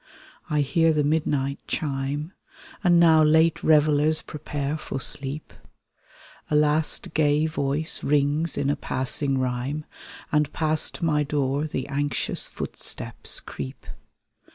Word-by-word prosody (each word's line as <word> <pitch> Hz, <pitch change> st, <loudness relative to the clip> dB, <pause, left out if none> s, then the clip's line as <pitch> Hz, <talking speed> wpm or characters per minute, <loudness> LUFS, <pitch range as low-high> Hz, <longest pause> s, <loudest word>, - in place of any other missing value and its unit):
I 150 Hz, -1 st, +2 dB
hear 165 Hz, +3 st, +2 dB
the 150 Hz, -1 st, +1 dB
midnight 145 Hz, -2 st, 0 dB
chime, 145 Hz, +3 st, -3 dB, 0.5 s
And 175 Hz, -2 st, +5 dB
now 160 Hz, -2 st, +6 dB
late 160 Hz, +1 st, +4 dB
reveUers 155 Hz, 0 st, +3 dB
prepare 145 Hz, -1 st, -4 dB
for 145 Hz, -3 st, -5 dB
sleep; 140 Hz, +3 st, -4 dB, 1.0 s
A 150 Hz, -, +1 dB
last 150 Hz, +1 st, +1 dB
gay 150 Hz, 0 st, +2 dB
voice 155 Hz, 0 st, 0 dB
rings 145 Hz, +2 st, +1 dB
in 140 Hz, 0 st, +1 dB
a -, -, 0 dB
passing 135 Hz, +1 st, -2 dB
rhyme, 130 Hz, +4 st, -2 dB, 0.5 s
And 150 Hz, -2 st, +2 dB
past 155 Hz, +2 st, -1 dB
my 150 Hz, -2 st, +2 dB
door 145 Hz, 0 st, -1 dB
the 130 Hz, -4 st, -4 dB
anxious 145 Hz, -2 st, -1 dB
footsteps -, -, -2 dB
creep. 65 Hz, -2 st, -8 dB
150 Hz, 120 wpm, -25 LUFS, 140-155 Hz, 1.0 s, now